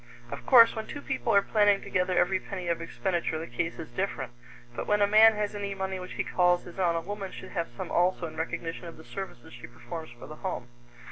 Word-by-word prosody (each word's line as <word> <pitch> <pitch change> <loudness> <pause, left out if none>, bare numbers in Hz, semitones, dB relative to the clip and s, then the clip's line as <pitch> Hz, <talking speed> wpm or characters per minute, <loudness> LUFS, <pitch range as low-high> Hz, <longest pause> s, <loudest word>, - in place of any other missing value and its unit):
Of - - -7
course, 235 -3 +8
when 220 -1 -4
two 290 - -7
people 120 - -1
are 200 - +6
planning 205 -2 +4
together 180 -1 0
every 185 +2 +3
penny 185 -2 -6
of 170 -1 0
expenditure, 170 -1 -2
the 160 - -4
case 165 +7 -3
is 160 - -8
different; 185 -10 -3 0.4
but - - -4
when 210 0 +3
a 205 - +5
man 215 +2 +7
has 210 0 -2
any 200 -1 -4
money 190 -1 -3
which 180 - -7
he - - -1
calls 180 -1 +2
his 175 +2 -11
own, 175 -2 +2
a 165 - 0
woman 200 +1 -5
should 190 - -9
have 170 -3 -2
some - - -5
also 180 0 +2
in 160 -1 -7
recognition 165 +1 -4
of 165 - -10
the 160 - -13
services 190 -13 -8
she 120 - -10
performs 140 +7 -8
for 120 0 -12
the 155 - -10
home. 180 -10 -4
180 Hz, 240 wpm, -28 LUFS, 165-200 Hz, 0.4 s, course